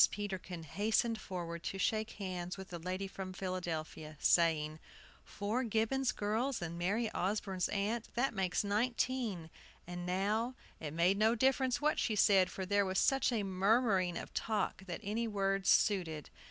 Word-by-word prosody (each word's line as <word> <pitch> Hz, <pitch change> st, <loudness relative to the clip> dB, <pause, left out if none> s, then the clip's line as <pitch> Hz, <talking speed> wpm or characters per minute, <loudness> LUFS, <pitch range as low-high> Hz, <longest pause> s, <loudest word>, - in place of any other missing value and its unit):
Peterkin 190 Hz, -4 st, -5 dB
hastened 220 Hz, +6 st, 0 dB
forward 170 Hz, -2 st, -5 dB
to 195 Hz, -, -4 dB
shake 215 Hz, +3 st, 0 dB
hands 185 Hz, -2 st, -4 dB
with 190 Hz, 0 st, -8 dB
the 175 Hz, -, -6 dB
lady 185 Hz, +3 st, -3 dB
from 190 Hz, -1 st, -6 dB
Philadelphia, 165 Hz, -5 st, -4 dB
saying: 155 Hz, -2 st, +3 dB, 0.4 s
"Four 215 Hz, +5 st, -2 dB
Gibbons 235 Hz, +4 st, +1 dB
girls 225 Hz, +6 st, -1 dB
and 170 Hz, -1 st, -4 dB
Mary 205 Hz, +6 st, 0 dB
Osborne's 190 Hz, -1 st, -1 dB
aunt, 215 Hz, +3 st, -1 dB
that 245 Hz, +2 st, +1 dB
makes 190 Hz, -2 st, 0 dB
nineteen; 215 Hz, -4 st, -1 dB, 0.3 s
and 175 Hz, 0 st, -6 dB
now" 205 Hz, +7 st, 0 dB, 0.2 s
It 155 Hz, -2 st, -5 dB
made 180 Hz, +4 st, +3 dB
no 220 Hz, +2 st, +4 dB
difference 260 Hz, +1 st, +2 dB
what 300 Hz, +1 st, +2 dB
she 220 Hz, -, +1 dB
said; 195 Hz, -2 st, +5 dB
for 190 Hz, 0 st, -5 dB
there 200 Hz, +1 st, +3 dB
was 190 Hz, 0 st, -1 dB
such 270 Hz, -1 st, +3 dB
a 225 Hz, -4 st, 0 dB
murmuring 195 Hz, -1 st, +2 dB
of -, -, -7 dB
talk 205 Hz, -3 st, -1 dB
that 175 Hz, -, -5 dB
any 225 Hz, +3 st, -1 dB
words 195 Hz, -2 st, 0 dB
suited. 170 Hz, -8 st, +2 dB
195 Hz, 155 wpm, -34 LUFS, 180-220 Hz, 0.4 s, said